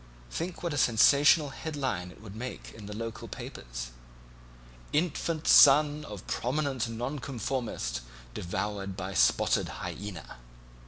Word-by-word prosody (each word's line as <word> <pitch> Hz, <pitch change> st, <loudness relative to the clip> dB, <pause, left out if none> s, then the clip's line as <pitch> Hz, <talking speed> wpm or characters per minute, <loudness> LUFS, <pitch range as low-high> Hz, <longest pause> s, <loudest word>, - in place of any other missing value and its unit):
Think 175 Hz, +2 st, -4 dB
what 170 Hz, -3 st, -1 dB
a 145 Hz, -, 0 dB
sensational 140 Hz, +6 st, +5 dB
headline 135 Hz, -, -3 dB
it 100 Hz, -, -15 dB
would 105 Hz, -2 st, -9 dB
make 125 Hz, +3 st, -6 dB
in 105 Hz, -2 st, -10 dB
the 105 Hz, -, -6 dB
local 115 Hz, 0 st, -5 dB
papers: -, -, -7 dB, 1.0 s
'Infant 160 Hz, 0 st, -1 dB
son 150 Hz, +1 st, +7 dB
of 105 Hz, -7 st, -8 dB
prominent 130 Hz, -2 st, -1 dB
Nonconformist 120 Hz, -, -3 dB, 0.3 s
devoured 95 Hz, +3 st, -3 dB
by 95 Hz, +1 st, -4 dB
spotted -, -, +3 dB, 0.2 s
hyaena.' 95 Hz, -11 st, -7 dB
120 Hz, 115 wpm, -29 LUFS, 100-145 Hz, 1.0 s, son